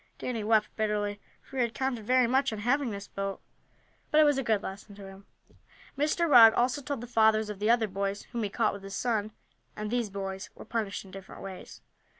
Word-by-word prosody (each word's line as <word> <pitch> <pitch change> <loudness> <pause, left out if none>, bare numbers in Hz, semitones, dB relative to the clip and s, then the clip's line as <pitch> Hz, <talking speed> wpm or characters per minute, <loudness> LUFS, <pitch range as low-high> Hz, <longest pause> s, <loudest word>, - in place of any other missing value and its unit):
Danny 235 -4 -3
wept 215 0 +2
bitterly, 210 -1 -1 0.2
for 270 - -10
he - - +2
had 235 -1 -1
counted 250 -5 -2
very 255 0 +4
much 265 +2 +2
on 220 - -4
having 250 +5 +1
this 200 -1 -6
boat. 195 0 -4 0.7
But 305 - +4
it - - +8
was 290 -2 +3
a - - -1
good 220 -4 +1
lesson 200 +1 -8
to 200 -1 -11
him. 195 +1 -13 0.7
Mr. 305 +4 +1
Rugg 230 -6 +8
also 255 +3 +1
told 275 -2 -4
the - - -6
fathers 220 -2 +3
of 200 - -9
the 210 +2 0
other 235 -2 +4
boys 195 +1 -3
whom 240 -1 -3
he 210 - -1
caught 215 +1 +1
with 200 - -8
his 195 0 -7
son, 220 -3 -1 0.4
and 210 0 -5
these 240 -3 0
boys 195 0 -5
were - - -11
punished 215 -4 -3
in 190 - -14
different 195 0 -10
ways. 190 -2 -9
220 Hz, 220 wpm, -29 LUFS, 200-245 Hz, 0.7 s, it